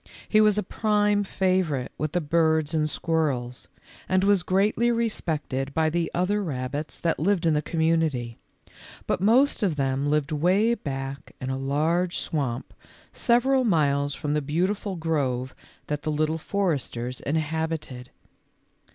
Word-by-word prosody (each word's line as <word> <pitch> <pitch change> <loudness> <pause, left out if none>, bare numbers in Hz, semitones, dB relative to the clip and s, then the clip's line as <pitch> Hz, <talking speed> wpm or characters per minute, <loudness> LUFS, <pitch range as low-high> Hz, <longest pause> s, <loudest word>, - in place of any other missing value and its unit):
He 215 - +4
was 210 -1 +4
a 210 - +1
prime 210 0 +1
favor 185 -5 +1
ite 125 - -5
with 155 -1 -3
the 175 - +1
birds 160 0 +2
and 155 -1 +1
squirrels, 140 -8 -1 0.4
and 185 0 +3
was 200 -2 +4
greatly 210 +6 +2
respected 155 - -2
by 160 -1 +2
the 170 0 0
other 200 +4 0
rabbits 145 -1 -4
that 165 - -1
lived 180 +2 +1
in 160 - +4
the 150 - +1
community; 160 -8 0 0.7
but - - -1
most 245 +7 +4
of 190 -7 +1
them 135 0 0
lived 150 +1 0
way 185 +9 +3
back 135 -8 -6
in 130 0 -3
a - - -1
large 155 +6 0
swamp 135 -6 -3 0.4
several 260 +2 +3
miles 145 - +1
from 145 -1 -2
the 150 - +1
beautiful 185 +7 -1
grove 135 -6 -1 0.3
that 150 -1 -3
the 155 - -2
Little 155 +2 0
For 195 +1 0
esters 125 -2 -5
inhabited. 155 -4 -3
160 Hz, 150 wpm, -25 LUFS, 140-190 Hz, 0.7 s, He